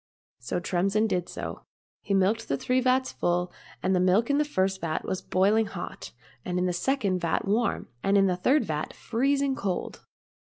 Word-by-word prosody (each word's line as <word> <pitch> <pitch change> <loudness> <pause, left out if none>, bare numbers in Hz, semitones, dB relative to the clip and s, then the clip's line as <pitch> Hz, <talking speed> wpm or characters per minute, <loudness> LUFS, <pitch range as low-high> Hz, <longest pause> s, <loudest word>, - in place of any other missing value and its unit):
So 120 +7 -3
Tremsin 195 +5 +1
did 180 -5 -1
so. - - -6 0.4
He 200 - -1
milked 205 +4 +2
the 140 - 0
three 255 - +1
vats 255 +1 +2
full, 175 +1 0 0.3
and 190 - +2
the - - +3
milk 190 +8 +3
in 285 - +2
the - - +4
first 190 -9 -1
vat 160 -2 -2
was 185 - -2
boiling 205 +4 +2
hot, - - -7 0.3
and 180 -1 -2
in 180 - +1
the 180 - 0
second 200 -2 0
vat 170 -2 -1
warm, 220 +4 0
and 200 +1 +3
in 195 - +5
the 185 -2 +2
third 265 +11 +2
vat 155 -2 -3
freezing 275 +3 0
cold. 190 -6 -3
195 Hz, 190 wpm, -27 LUFS, 180-230 Hz, 0.4 s, in